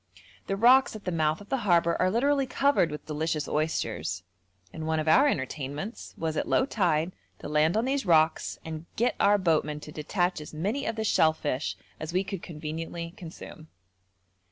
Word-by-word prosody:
The 195 - 0
rocks 245 +4 +5
at 215 - -9
the 180 - -1
mouth 155 +1 +1
of 205 - -13
the 270 - +1
harbour 170 -5 +3
are 185 - +4
literally 275 +6 +2
covered 275 -9 +2
with 150 0 -7
delicious 155 0 -2
oysters, 115 - -2 0.5
and 160 0 -5
one 160 0 +1
of 155 - -3
our 265 - +6
entertainments 145 - -4
was 160 -1 -2
at - - -1
low - - +3
tide 175 - +1 0.3
to - - -8
land 150 +5 +2
on 225 - +1
these 270 +1 0
rocks 160 -3 +2
and 160 +1 -6
get 240 +3 +2
our 205 +1 +5
boatmen 155 -5 +1
to 150 - -9
detach 175 +3 -1
as 150 - -10
many 210 - -2
of 225 - -1
the 220 - -2
shellfish 155 -7 +1 0.2
as 155 +2 -5
we 185 +1 +2
could 195 -2 -5
conveniently 165 +1 -6
consume. 165 -3 -10
165 Hz, 180 wpm, -28 LUFS, 155-205 Hz, 0.5 s, our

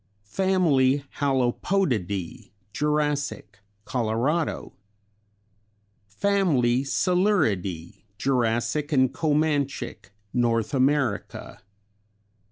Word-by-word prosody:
" 105 0 -30
Hallopodidæ 135 - 0 0.2
Jurassic, 145 -8 -1 0.3
Colorado. 125 +7 -1 0.7
" 105 -1 -37
Coeluridæ 140 - +1 0.2
Jurassic 125 +4 0
and 130 -3 +3
Comanchic, 145 -6 -1 0.2
North 115 -2 +1
America. 135 -5 -1
130 Hz, 55 wpm, -25 LUFS, 110-150 Hz, 0.7 s, and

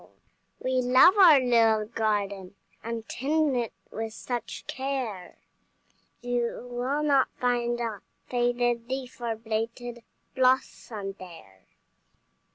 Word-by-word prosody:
We 255 0 0
love 255 +10 +6
our 330 -7 +9
little 225 -4 +3
garden, 205 -4 -2 0.3
And 230 -1 -5
tend 295 +1 0
it 235 -3 -1 0.2
with 225 0 -4
such 240 -2 -5
care, 260 -9 -4 0.8
You 245 0 -2
will 260 +5 -1
not 280 -3 +4
find 240 -1 0
a 225 -4 -3 0.3
faded 240 -1 0
leaf 260 -2 -5
Or 230 -2 -1
blighted 230 +2 -4 0.3
blossom 255 -6 0
there. 160 - -13
240 Hz, 105 wpm, -27 LUFS, 220-255 Hz, 0.8 s, our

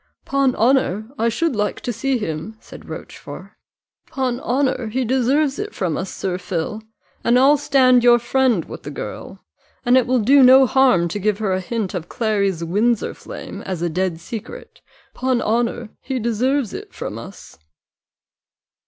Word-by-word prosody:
"'Pon 275 -2 +1
honour, 225 -3 +1
I 230 - +2
should 290 +4 -1
like 210 0 -1
to 245 - -3
see 270 +3 0
him," 175 +1 -5
said - - -13
Rochfort: - - -9 0.6
"'pon 255 -2 -2
honour, 255 -1 0
he 250 +4 -1
deserves 265 +4 +1
it - - -5
from 175 -5 -1
us, 190 - -4
Sir 185 -1 -3
Phil, 180 +4 -4 0.4
and 235 +1 +4
I'll 275 +3 +6
stand 260 -4 +4
your 240 -1 +7
friend 240 -6 +1
with - - -9
the - - -8
girl, - - -8 0.4
and 245 +1 +4
it 255 -2 +4
will 255 +1 +2
do 265 +5 +5
no 260 +1 +8
harm 255 -10 +3
to 205 - -4
give 205 0 0
her 205 -3 -1
a 185 - -1
hint 215 0 -3
of 175 -2 -5
Clary's 200 -6 0
Windsor 210 +7 0
flame, - - -9
as 180 -3 -4
a 175 - 0
dead 180 0 -2
secret 230 - -9 0.3
'pon 255 -1 0
honour, 235 0 -1
he 265 -1 -3
deserves 240 +2 0
it - - -9
from - - -5
us." - - -12
235 Hz, 170 wpm, -20 LUFS, 200-260 Hz, 0.6 s, no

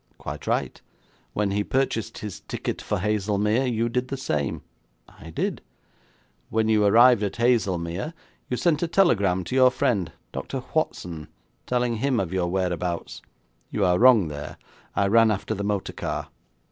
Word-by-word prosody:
'Quite - - -7
right.' - - -1 0.5
'When 105 -1 0
he 105 +1 0
purchased 130 -2 -1
his 105 -4 -6
ticket - - -4
for - - -2
Haslemere, 105 +4 +1
you 115 0 0
did 125 +2 -1
the 135 - -4
same.' 75 - -2 0.4
'I 80 - -13
did.' 80 - -2 0.9
'When 110 0 +1
you 110 -1 +3
arrived 120 +2 +6
at 100 -2 -2
Haslemere, 100 - 0 0.3
you 125 - -1
sent 155 +4 +2
a 170 - +1
telegram 100 - +3
to 105 - -4
your 130 -1 +7
friend, 125 -10 0 0.2
Dr 125 - -5
Watson, 85 - -2 0.4
telling 125 -2 0
him 130 +1 +1
of 95 -3 -2
your 90 -2 0
whereabouts.' 90 -1 -2 0.5
'You 100 - 0
are 90 0 +3
wrong 120 -7 +6
there; 75 -1 -7 0.4
I 100 - +2
ran 115 +3 +5
after 105 +1 -1
the 100 -1 -4
motor 100 -1 -2
car.' - - -4
105 Hz, 160 wpm, -25 LUFS, 95-125 Hz, 0.9 s, your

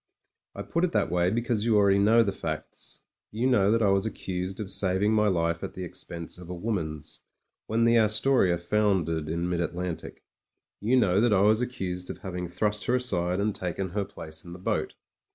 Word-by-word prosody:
I 100 - -5
put 165 - -1
it 180 - +1
that 105 -6 +1
way, 90 0 +2
because 115 0 0
you 115 -2 +3
already 100 -1 +4
know 110 +3 +5
the 100 - -1
facts. 80 -4 -6 0.3
You 115 +4 -2
know 105 -7 +4
that 115 +1 +3
I 100 - +4
was 95 0 +2
accused 95 -3 -4
of 100 -3 -3
saving 100 +2 +2
my 105 -1 +3
life 85 -3 0
at - - -6
the 95 - -5
expense 85 0 -7
of 90 -1 -11
a 90 - -4
woman's 80 -7 -4 0.5
when 115 +1 +1
the 115 0 +5
Astoria 110 -3 +3
foundered 85 -4 0
in 85 +2 -1
mid 90 -1 -1
Atlantic; 85 0 -5 0.6
you 115 +5 +1
know 100 -6 +3
that 120 -2 +3
I 95 - +4
was 110 +3 +4
accused 90 -7 -3
of - - -5
having 90 -2 -5
thrust 105 +3 -1
her 125 - +2
aside 90 -8 0
and 105 +1 0
taken 95 0 -3
her 100 +3 -1
place 80 -4 -9
in 85 - -10
the - - -8
boat. 90 - -2
95 Hz, 205 wpm, -27 LUFS, 90-110 Hz, 0.6 s, know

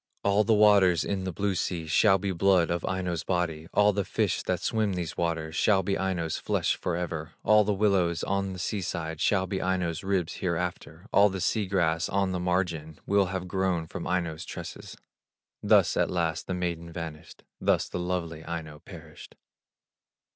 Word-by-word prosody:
All 100 +1 +3
the 110 +1 +3
waters 100 -5 +5
in 95 -2 -2
the 95 - -2
blue 100 +3 -1
sea 85 -2 -2
Shall 95 +5 +4
be 95 +1 -2
blood 90 -1 +3
of 85 -1 -1
Aino's 90 -3 -2
body; 85 -3 -2
All 105 0 +4
the 100 0 0
fish - - 0
that - - -1
swim 110 -3 0
these 90 -3 -4
waters 80 -2 -2
Shall 95 -1 +3
be 95 +2 0
Aino's 90 -4 -2
flesh - - 0
forever; 85 -2 -3
All 105 0 +5
the 105 - 0
willows 95 -5 +2
on 100 -1 -1
the - - -7
sea 95 +3 -2
side 80 -3 -4
Shall 95 -2 +2
be 95 +1 -3
Aino's 90 -3 -1
ribs 95 -3 -1
hereafter; 90 0 -3
All 105 +1 +6
the 95 0 -4
sea 105 +2 0
grass 85 -3 +1
on 100 -1 +1
the 90 - -2
margin 85 -4 -1
Will 100 -1 +3
have 90 0 -4
grown 90 -2 0
from - - -6
Aino's 85 -4 -1
tresses." - - -8 0.6
Thus - - +4
at - - +2
last 85 -3 -1
the 95 - -2
maiden 85 -2 -3
vanished, 80 -2 -8 0.2
Thus - - +2
the - - -5
lovely 85 -3 -3
Aino 80 -3 -6
perished. 80 -3 -12
90 Hz, 180 wpm, -27 LUFS, 85-95 Hz, 0.6 s, All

